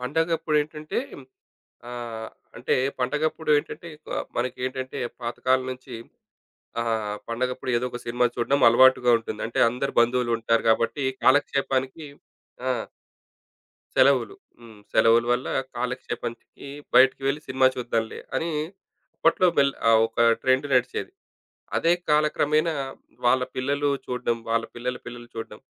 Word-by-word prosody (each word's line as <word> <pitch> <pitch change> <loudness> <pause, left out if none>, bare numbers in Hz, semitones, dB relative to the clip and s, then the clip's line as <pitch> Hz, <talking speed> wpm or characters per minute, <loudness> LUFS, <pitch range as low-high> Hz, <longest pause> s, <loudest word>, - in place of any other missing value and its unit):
పండగప్పుడేంటంటే 155 +1 -1 0.9
ఆహ్, 115 -2 -6 0.3
అంటే - - 0 0.3
పండగప్పుడేంటంటే 150 +4 0 0.2
కు - - -12 0.3
మనకేంటంటే 130 +1 -3 0.2
పాతకాలం 130 +2 0
నుంచి 130 0 -8 0.9
ఆహ్, 110 -3 -1
పండగప్పుడు 125 +2 -2
ఏదో 125 - -2
ఒక 120 - -6
సినిమా 120 +1 +1
చూడ్డం 135 +3 +1
అలవాటుగా 125 0 +5
ఉంటుంది. 110 -2 -6
అంటే 120 - -3
అందరు 125 +3 -3
బంధువులుంటారు 120 -1 +1
గాబట్టి 115 +5 +1 0.2
కాలక్షేపానికి 135 +1 +1 0.6
ఆ! - - +3 1.3
సెలవులు. 395 - +4 0.3
హ్మ్. 110 -3 -14
సెలవుల 115 +1 +5
వల్ల 125 +1 -1 0.3
కాలక్షేపానికి 120 +1 -5 0.3
బయటికి 135 +1 +5
వెళ్ళి 140 +2 0
సినిమా 130 0 +3
చూద్దాంలే 115 -2 -2 0.2
అని 165 +4 -1 0.7
అప్పట్లో 165 +3 +3
మెల్ 140 -1 +4 0.2
ఆహ్, 110 -1 +6
ఒక 115 - -15 0.2
ట్రెండ్ 130 +2 +2
నడిచేది. 125 - 0 0.6
అదే 165 - +3 0.2
కాలక్రమేణా 150 +1 +2 0.5
వాళ్ళ 130 +1 +4
పిల్లలు 140 +2 0 0.2
చూడ్డం, 125 -2 -1
వాళ్ళ 115 0 +1
పిల్లల 125 +1 -3
పిల్లలు 120 0 -9
చూడడం, 115 - -7
125 Hz, 110 wpm, -25 LUFS, 120-140 Hz, 1.3 s, ఆహ్